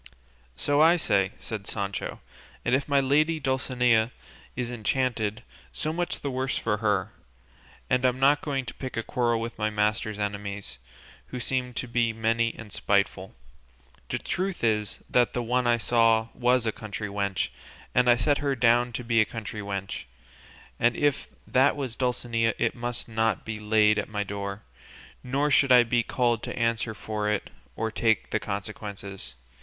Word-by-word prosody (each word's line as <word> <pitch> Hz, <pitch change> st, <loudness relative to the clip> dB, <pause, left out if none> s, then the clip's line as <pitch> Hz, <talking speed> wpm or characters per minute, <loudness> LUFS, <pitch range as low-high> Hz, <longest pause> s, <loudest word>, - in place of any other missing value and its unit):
"So 145 Hz, -, +2 dB
I 165 Hz, +2 st, +7 dB
say," 100 Hz, -, +1 dB
said 105 Hz, -3 st, -6 dB
Sancho, 100 Hz, -2 st, -3 dB, 0.4 s
"and 120 Hz, -, +1 dB
if 135 Hz, +2 st, +2 dB
my 140 Hz, -1 st, +4 dB
lady 150 Hz, +4 st, +2 dB
Dulcinea 125 Hz, -4 st, +2 dB, 0.5 s
is 125 Hz, -1 st, -3 dB
enchanted, 110 Hz, -2 st, -1 dB, 0.3 s
so 155 Hz, +1 st, -2 dB
much 175 Hz, +1 st, -2 dB
the 140 Hz, -, -2 dB
worse 130 Hz, +1 st, -1 dB
for 105 Hz, -2 st, 0 dB
her, 105 Hz, -1 st, 0 dB, 0.8 s
and 125 Hz, 0 st, +2 dB
I'm 130 Hz, 0 st, +2 dB
not 140 Hz, +2 st, +4 dB
going 135 Hz, -3 st, -2 dB
to 120 Hz, -, -7 dB
pick 130 Hz, -3 st, -6 dB
a 115 Hz, -, 0 dB
quarrel 120 Hz, -1 st, +1 dB
with 115 Hz, 0 st, -5 dB
my 110 Hz, 0 st, +1 dB
master's 105 Hz, 0 st, 0 dB
enemies, 100 Hz, -7 st, -4 dB, 0.5 s
who 125 Hz, -, -6 dB
seem 125 Hz, 0 st, -2 dB
to 125 Hz, -, -3 dB
be 115 Hz, -1 st, +1 dB
many 115 Hz, +1 st, +1 dB
and 105 Hz, -3 st, -10 dB
spiteful. 100 Hz, -1 st, 0 dB, 0.7 s
The -, -, 0 dB
truth 185 Hz, -3 st, -3 dB
is 105 Hz, -2 st, 0 dB
that 120 Hz, -1 st, +3 dB
the 120 Hz, -, -1 dB
one 125 Hz, +1 st, +1 dB
I 120 Hz, 0 st, +4 dB
saw 115 Hz, -1 st, +3 dB
was 125 Hz, -1 st, +2 dB
a 110 Hz, -, +2 dB
country 105 Hz, 0 st, -6 dB
wench, 100 Hz, -6 st, -1 dB, 0.4 s
and 125 Hz, 0 st, +4 dB
I 120 Hz, -, +7 dB
set 140 Hz, +5 st, +2 dB
her 140 Hz, -2 st, 0 dB
down 120 Hz, 0 st, +3 dB
to 125 Hz, -, -4 dB
be 115 Hz, -1 st, +3 dB
a -, -, +3 dB
country 110 Hz, -1 st, -6 dB
wench; 100 Hz, -1 st, -4 dB, 0.7 s
and 120 Hz, 0 st, +3 dB
if 145 Hz, -1 st, +1 dB, 0.2 s
that 130 Hz, +2 st, +3 dB
was 135 Hz, -5 st, -3 dB
Dulcinea 120 Hz, -3 st, 0 dB
it -, -, +1 dB
must 120 Hz, 0 st, -4 dB
not 110 Hz, 0 st, 0 dB
be 110 Hz, -1 st, -4 dB
laid 105 Hz, 0 st, +4 dB
at -, -, -4 dB
my 105 Hz, -1 st, -1 dB
door, 100 Hz, 0 st, -5 dB, 0.6 s
nor 140 Hz, +4 st, 0 dB
should 135 Hz, -1 st, +4 dB
I 125 Hz, -1 st, +8 dB
be 120 Hz, +1 st, +2 dB
called 120 Hz, -2 st, +1 dB
to -, -, -5 dB
answer 115 Hz, -1 st, 0 dB
for 105 Hz, 0 st, -2 dB
it 105 Hz, -1 st, -2 dB, 0.2 s
or 110 Hz, 0 st, -2 dB
take 110 Hz, 0 st, +1 dB
the 110 Hz, -, +1 dB
consequences. 100 Hz, -, -6 dB
115 Hz, 170 wpm, -27 LUFS, 105-125 Hz, 0.8 s, I